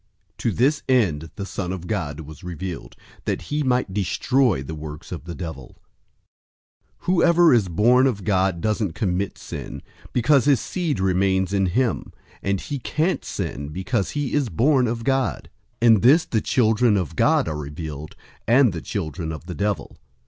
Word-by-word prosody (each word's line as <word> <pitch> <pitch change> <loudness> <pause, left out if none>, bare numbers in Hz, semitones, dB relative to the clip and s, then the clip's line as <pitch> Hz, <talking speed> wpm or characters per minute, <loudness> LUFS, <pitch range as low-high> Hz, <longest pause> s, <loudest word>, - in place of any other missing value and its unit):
To - - 0
this 140 +4 +2
end 85 - +2
the 100 - -5
Son 95 -2 -4
of 90 -2 -5
God 80 -8 -3
was 75 -1 -11
revealed, 90 0 -6 0.3
that - - -1
he 150 - +1
might 125 -7 0
destroy 105 - +1
the 80 - -6
works 75 0 -8
of 85 -3 -6
the 85 -1 -6
devil. 80 -7 -7 1.3
003:009 - - -23
Whoever 175 -2 +5
is 110 -6 +3
born 120 +9 +4
of 105 -7 -2
God 95 -3 +1
doesn't 105 -4 0
commit 95 +1 -1
sin, - - -7 0.3
because 130 +2 +3
his 140 -4 +4
seed 170 - -2
remains 95 0 +1
in 95 -1 +2
him; 120 +6 -1 0.3
and 100 -1 0
he 140 +6 -5
can't 155 +8 -1
sin, 70 +2 -4
because 95 +6 -2
he 145 -3 -2
is 145 -5 +1
born 125 - +3
of 115 0 -3
God. 135 -1 -1 0.3
003:010 - - +6
In 100 - 0
this 150 +8 +5
the 110 -9 0
children 110 -2 +3
of 90 -7 -3
God - - +3
are 80 - -2
revealed, 75 0 -7 0.3
and 120 -2 +5
the 85 - -5
children 80 -4 -4
of 80 +1 -7
the 90 - -6
devil. 105 +2 -3
100 Hz, 170 wpm, -23 LUFS, 85-125 Hz, 1.3 s, 003:010